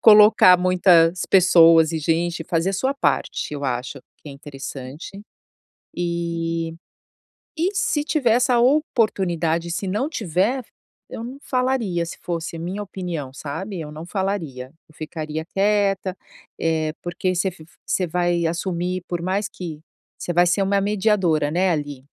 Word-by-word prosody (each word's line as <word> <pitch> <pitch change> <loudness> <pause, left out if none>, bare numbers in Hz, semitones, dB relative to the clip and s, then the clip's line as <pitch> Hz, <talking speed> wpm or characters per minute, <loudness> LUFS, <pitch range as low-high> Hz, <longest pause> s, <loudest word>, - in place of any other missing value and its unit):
colocar 210 -4 +7
muitas 180 -1 +4
pessoas 165 -3 +6
e 160 - -1
gente, 165 +1 -1
fazer 165 +3 0
a - - -4
sua 260 +8 0
parte, 215 - -1
eu 140 -1 -5
acho, 130 +2 -3 0.2
que - - -12
é - - -8
interessante. 135 0 -8 0.8
E 170 -1 -2 0.8
e 350 +5 0
se 295 -6 0
tiver 295 -6 +1
essa 245 +1 +3
oportunidade. 190 - +1
Se 185 +3 -3
não 210 +9 -1
tiver, 225 - -1 0.5
eu - - -6
não 255 +3 -7
falaria, 250 -10 0
se 170 - -7
fosse 170 -1 -4
a - - -7
minha 185 +5 -4
opinião, 175 -9 -5
sabe, 165 +7 -5
eu 150 -1 -7
não 155 +2 -8
falaria. 170 -10 -3 0.2
Eu 155 - -22
ficaria 155 0 -5
quieta, 195 0 0 0.4
eh, 160 -1 0
porque 180 +1 -2
você 190 +2 0
v 165 -3 -15 0.2
você 185 - 0
vai 175 0 0
assumir, 175 +1 -2
por 175 -1 -3
mais 190 +3 -1
que 165 -7 -8 0.4
você 175 - -3
vai 175 +1 +4
ser 180 +3 +2
uma 200 +1 +2
mediadora, 195 -7 +1
né, 180 +4 +1
ali, 145 -4 -3
175 Hz, 150 wpm, -22 LUFS, 160-200 Hz, 0.8 s, colocar